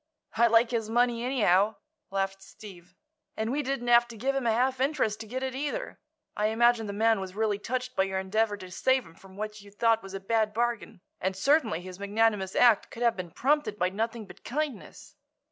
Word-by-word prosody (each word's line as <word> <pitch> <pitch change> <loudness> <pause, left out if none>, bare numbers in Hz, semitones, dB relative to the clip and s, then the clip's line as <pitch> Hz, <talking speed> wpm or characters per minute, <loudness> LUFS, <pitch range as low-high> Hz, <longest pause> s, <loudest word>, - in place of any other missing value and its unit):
"I 235 +1 +5
like 230 +1 +4
his 225 -3 -2
money, 240 0 +1
anyhow," 215 -5 +2 0.3
laughed 195 0 -2
Steve; 185 -3 -13 0.4
"and 220 +2 -1
we 290 +3 0
didn't 270 -3 -3
have 240 0 +6
to 230 -1 -11
give 265 +6 0
him 270 -3 -1
a - - +4
half 255 +3 +1
interest 265 -7 0
to 220 - -8
get 260 +4 -4
it, 260 -1 -2
either. 295 - -4 0.4
I 210 - +1
imagine 225 0 +3
the - - -3
man 220 +1 +2
was 190 -1 -7
really 210 -2 0
touched 255 +3 -4
by 190 - +2
your 190 0 -3
endeavor 205 +3 0
to 185 -2 -11
save 260 +7 +1
him 165 - -15
from 190 +2 -16
what 215 0 -5
you 200 - -14
thought 225 +2 +2
was 195 0 -9
a - - -4
bad 215 +1 0
bargain, 230 -4 -2 0.2
and 190 0 -1
certainly 245 - +2
his 185 +1 -10
magnanimous 205 -1 0
act 235 -4 +4
could 235 - -6
have 235 -1 +3
been 185 -2 -6
prompted 275 - 0
by 180 -2 +1
nothing 225 +3 -3
but - - -15
kindness." 285 -2 -5
220 Hz, 215 wpm, -28 LUFS, 200-240 Hz, 0.4 s, have